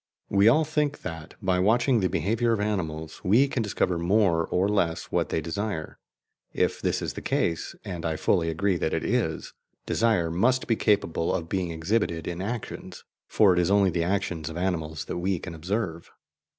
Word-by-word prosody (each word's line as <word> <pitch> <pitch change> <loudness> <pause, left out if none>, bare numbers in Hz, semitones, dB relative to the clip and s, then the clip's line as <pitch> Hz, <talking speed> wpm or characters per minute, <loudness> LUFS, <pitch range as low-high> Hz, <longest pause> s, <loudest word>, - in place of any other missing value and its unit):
We 100 +1 +4
all 155 +7 +5
think 150 -1 -1
that, 80 -1 -7
by 95 -1 +2
watching 120 +5 +3
the 95 -2 +1
behaviour 115 +6 +1
of 110 - -1
animals, 80 -7 -3
we 115 +9 +4
can 135 -3 -2
discover 95 -4 0
more 85 -2 +2
or 90 +2 +1
less 85 -5 0
what - - 0
they 80 - -1
desire. 85 0 -4 0.5
If - - 0
this - - 0
is - - -3
the - - -7
case 85 -1 -1
and 85 -3 -5
I 80 -1 -1
fully 80 +1 +1
agree 95 +3 0
that 80 - -1
it - - -2
is - - -1 0.3
desire 110 -8 +1
must 125 +9 +2
be 115 - +2
capable 100 -7 +1
of 85 -3 -2
being 95 -3 -1
exhibited 85 0 -1
in 85 +1 -4
actions, 110 +3 -6 0.2
for 100 -4 +4
it 90 - +1
is 90 +1 +2
only 100 -2 +4
the 85 0 0
actions 90 -3 -1
of 80 - -7
animals 80 -6 -2
that - - -4
we 95 +1 0
can 85 +1 -7
observe. 85 0 -3
95 Hz, 190 wpm, -26 LUFS, 85-105 Hz, 0.5 s, all